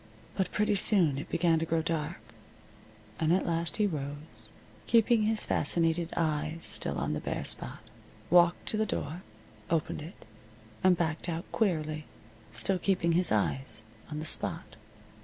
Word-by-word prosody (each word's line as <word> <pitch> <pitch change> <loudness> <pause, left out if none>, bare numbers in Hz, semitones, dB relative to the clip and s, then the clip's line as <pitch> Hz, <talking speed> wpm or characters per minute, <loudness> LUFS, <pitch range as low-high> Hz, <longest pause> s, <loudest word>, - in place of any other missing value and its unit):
But 190 -2 -1
pretty 210 0 +1
soon 180 -8 +3
it - - -7
began 165 -2 +2
to 165 - -1
grow 165 0 +1
dark, 165 +1 -2 1.0
and 160 0 +2
at 185 - +2
last 165 -2 -1
he 210 - +3
rose, 145 -3 -5 0.4
keeping 230 0 +4
his 215 0 +2
fascinated 165 0 +1
eyes 155 0 -1
still - - -3
on - - -1
the - - -2
bare - - -3
spot, - - +2 0.5
walked 175 0 +5
to 215 - -1
the 220 - +2
door, 165 -2 -3 0.5
opened 160 -2 -1
it, 165 +5 -11 0.6
and 185 -1 +5
backed 165 0 -2
out 165 0 -3
queerly, 155 -7 0 0.5
still 180 - +1
keeping 175 -3 +1
his 175 +1 +2
eyes 110 +3 0 0.3
on 150 - -5
the 155 - -4
spot. - - +1
165 Hz, 155 wpm, -30 LUFS, 155-185 Hz, 1.0 s, walked